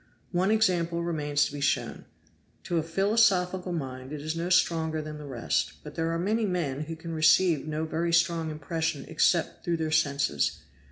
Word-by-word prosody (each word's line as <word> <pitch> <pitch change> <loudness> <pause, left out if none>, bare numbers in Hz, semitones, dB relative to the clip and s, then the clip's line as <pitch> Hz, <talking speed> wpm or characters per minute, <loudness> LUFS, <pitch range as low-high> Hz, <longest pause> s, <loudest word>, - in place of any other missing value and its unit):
One 185 +2 +1
example 175 -6 +2
remains 150 -3 0
to 145 - -6
be 145 - -5
shown. 145 - -1 0.6
To 170 -2 0
a - - +1
philosophical 190 0 +2
mind 130 -5 -5
it 150 - -5
is 155 +2 -3
no 170 +2 -2
stronger 160 -3 +2
than 150 0 -6
the 150 - -8
rest; 115 - -1
but - - -9
there 165 0 -1
are 165 - -1
many 215 +5 0
men 155 -6 -2
who 165 +1 -6
can 165 +1 -7
receive 155 0 +4
no 155 +1 -2
very 165 +2 -1
strong 170 -1 +2
impression 155 0 -3
except - - +1
through 170 -1 0
their 160 -1 -2
senses. 140 - +1
165 Hz, 180 wpm, -28 LUFS, 150-175 Hz, 0.6 s, receive